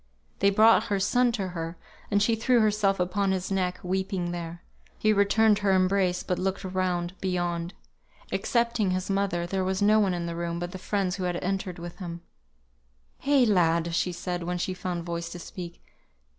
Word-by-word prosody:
They 200 - +5
brought 220 +3 +5
her 200 -3 0
son 245 +5 +3
to 195 -5 -2
her, 165 -1 -5 0.3
and 205 0 +3
she 230 - +2
threw 240 +2 +3
herself 210 -3 +2
upon 190 +2 +1
his 190 0 -2
neck, 185 -2 0
weeping 185 -1 -1
there. 170 0 -6 0.3
He 215 0 +3
returned 210 +1 +4
her 200 -2 +2
embrace, 185 -1 +2
but 180 - -2
looked 190 +1 -2
around, 185 -2 -1
beyond. 175 -1 -2 0.6
Excepting 235 -4 +1
his 185 +1 -1
mother 195 -3 0
there 190 +2 -1
was 190 0 -1
no 210 +1 +5
one 195 -4 +2
in 170 -1 -3
the 170 0 -4
room 170 0 -3
but 175 +1 -4
the 185 - -7
friends 195 -1 -1
who 185 - -2
had 175 -1 -1
entered 190 -1 -2
with 170 0 -8
him. 170 -2 -6 1.1
"Eh, 280 -3 +5
lad!" 170 -4 +2
said 175 +1 -1
she, - - -6
when 180 +1 -2
she 185 +1 -2
found 180 -1 -4
voice 170 0 -4
to 175 - -7
speak. 175 0 -9
185 Hz, 185 wpm, -27 LUFS, 175-200 Hz, 1.1 s, They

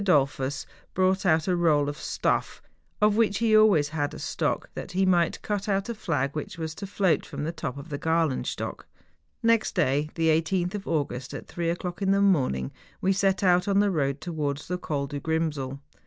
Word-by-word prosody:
Dollfiis 140 -5 +1 0.3
brought 185 +1 +2
out 160 0 +3
a 180 - +2
roll 155 -4 +3
of 145 - -3
stuff, - - -1 0.4
of 210 0 +4
which 215 -3 +2
he 230 -1 +1
had 215 - +7
always 160 -9 +4
a 145 -2 -2
stock, - - -2
that - - -7
he 190 +1 +2
might 175 -3 +2
cut 205 0 -2
out 195 +2 0
a - - -1
flag 145 - -2
which 155 +3 -5
was 160 -1 -4
to 200 +4 -7
float 190 -5 +1
from - - -6
the 160 - -1
top 155 -5 -5
of 140 +4 -9
the 145 -1 -4
Galenstock. 160 -4 -1 0.6
Next 230 -1 +2
day, 145 +3 +1
the 165 -1 +2
18th 175 +3 +1
of 205 -2 -5
August, 135 -5 -2
at - - -7
three 170 -1 -2
o'clock 175 +2 -4
in 195 - +1
the 195 0 +4
morning, 135 - +2 0.3
we 195 - +2
set 195 0 +1
out 180 0 +4
on 200 -1 +2
the 205 -1 +3
road 140 -4 -1
towards 150 -4 -3
the 180 +1 -2
Col 145 -5 -2
du 145 +1 -5
Grimsel. 150 -4 -2
165 Hz, 200 wpm, -26 LUFS, 145-195 Hz, 0.6 s, had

